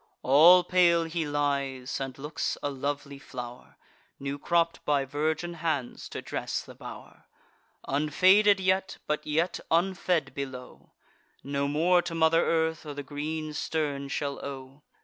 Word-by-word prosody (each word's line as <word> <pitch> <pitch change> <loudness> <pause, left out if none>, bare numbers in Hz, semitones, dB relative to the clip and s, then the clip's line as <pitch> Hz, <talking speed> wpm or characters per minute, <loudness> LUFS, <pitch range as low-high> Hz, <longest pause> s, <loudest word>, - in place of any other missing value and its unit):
All 165 +7 +7
pale 175 -2 +4
he 165 -1 -3
lies, 140 -3 -1
and 135 -1 -5
looks 150 +3 -3
a 145 - -1
lovely 140 +1 -4
flow'r, 125 -2 -9 0.4
New 140 +1 -4
cropp'd 170 +1 +1
by 145 -2 +1
virgin 155 +5 -2
hands, 155 -6 -3
to - - -6
dress - - -3
the - - -12
bow'r: - - -11 0.6
Unfaded 185 +8 +4
yet, 190 0 0
but 150 0 -2
yet 160 +4 0
unfed 175 -4 +1
below, 130 -2 -8 0.5
No 140 0 -1
more 170 +5 +3
to 170 - -5
mother 165 0 +4
earth 160 -1 0
or 150 -2 -7
the 145 - -5
green 155 +2 -4
stern 145 -2 -2
shall 140 0 -3
owe. 135 0 -8
150 Hz, 140 wpm, -28 LUFS, 140-165 Hz, 0.6 s, All